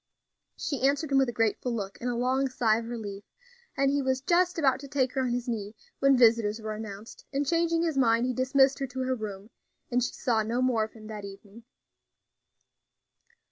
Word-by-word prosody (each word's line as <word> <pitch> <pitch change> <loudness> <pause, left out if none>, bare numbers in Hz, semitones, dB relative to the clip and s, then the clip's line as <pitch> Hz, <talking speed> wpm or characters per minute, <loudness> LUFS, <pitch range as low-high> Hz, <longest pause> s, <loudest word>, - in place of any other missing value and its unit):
She 280 - -3
answered 280 +2 +1
him 270 - +5
with 265 -2 +2
a - - -2
grateful 225 +2 0
look 200 -3 -5
and 245 - -1
a 245 - -1
long 260 +3 +1
sigh 225 -3 +2
of 230 0 -7
relief, 205 -4 -6 0.5
and 275 0 +3
he 285 0 +1
was 260 -1 0
just 355 +4 +2
about 270 -5 +2
to 280 - -9
take 265 -3 0
her 265 - 0
on 255 - 0
his 245 +1 -2
knee 215 -3 -4 0.2
when 275 -1 +5
visitors 225 -2 +4
were 215 -1 -4
announced, 215 0 -8
and, 280 +1 0
changing 335 +1 +1
his 320 -5 0
mind, 230 -1 +3
he 255 - -1
dismissed 265 +2 +3
her 270 - -2
to 260 +1 -5
her 260 0 0
room, 210 -2 -6 0.4
and 245 0 +2
she - - -2
saw 230 -3 +1
no 230 +3 -1
more 250 -3 +2
of 220 - -14
him 220 -2 -13
that 215 -1 -7
evening. 200 +3 -12
245 Hz, 210 wpm, -28 LUFS, 220-270 Hz, 0.5 s, him